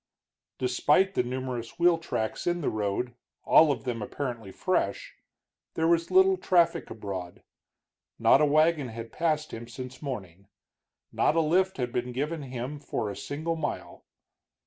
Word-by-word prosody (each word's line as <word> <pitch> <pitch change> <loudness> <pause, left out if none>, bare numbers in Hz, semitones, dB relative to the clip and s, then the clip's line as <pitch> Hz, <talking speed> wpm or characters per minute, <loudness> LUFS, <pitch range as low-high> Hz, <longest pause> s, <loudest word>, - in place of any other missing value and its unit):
Despite 145 +9 +2
the - - +2
numerous 125 -2 -4
wheel 170 -1 +4
tracks 110 -6 -3
in 175 0 +1
the - - 0
road, 110 +3 -2 0.3
all 155 -2 +6
of 120 -5 -3
them 120 -3 -3
apparently 115 -2 -5
fresh, - - -1 0.6
there 160 0 +1
was 170 0 +2
little 380 0 +5
traffic 175 - +2
abroad. 95 -5 -6 0.7
Not - - +5
a - - +6
wagon 155 -1 +3
had 115 0 -8
passed 155 -2 -1
him 115 +1 -7
since 125 +1 -8
morning, 100 - -6 0.6
not - - +2
a - - +4
lift 185 +4 +2
had 125 -2 -2
been 125 +1 -2
given 150 +5 -2
him 130 +2 -5
for 110 -6 -3
a - - -7
single 150 +10 -3
mile. 160 -2 -5
130 Hz, 150 wpm, -28 LUFS, 115-165 Hz, 0.7 s, all